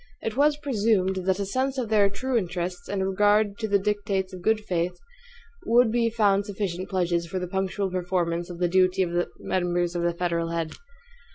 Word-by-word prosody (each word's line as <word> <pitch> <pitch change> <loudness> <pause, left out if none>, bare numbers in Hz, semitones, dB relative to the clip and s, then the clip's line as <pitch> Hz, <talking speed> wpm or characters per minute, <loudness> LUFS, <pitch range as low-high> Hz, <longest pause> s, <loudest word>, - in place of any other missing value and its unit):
It 225 - -3
was 290 +2 +3
presumed 200 -9 0
that 190 -1 +3
a 200 - -1
sense 260 +6 -1
of 245 -4 -2
their 205 -2 +4
true 255 +6 -3
interests, 180 -3 -2
and 195 -1 -1
a - - 0
regard 205 +1 +2
to 220 - -2
the 200 -1 +3
dictates 200 -1 -1
of 185 - -8
good 220 +3 +2
faith, 180 -3 -2 0.7
would 235 0 +5
be 230 0 +2
found 205 -3 +2
sufficient 190 -3 -3
pledges 175 -2 0
for 185 - -4
the 180 - -2
punctual 190 +1 -2
performance 175 -1 -1
of 175 - -7
the 175 0 +1
duty 185 +1 +3
of 175 - -3
the 175 0 0
members 175 -1 -1
to 175 - -2
the 170 0 0
federal 170 -1 -1
head. 165 -1 -2
190 Hz, 200 wpm, -26 LUFS, 175-210 Hz, 0.7 s, would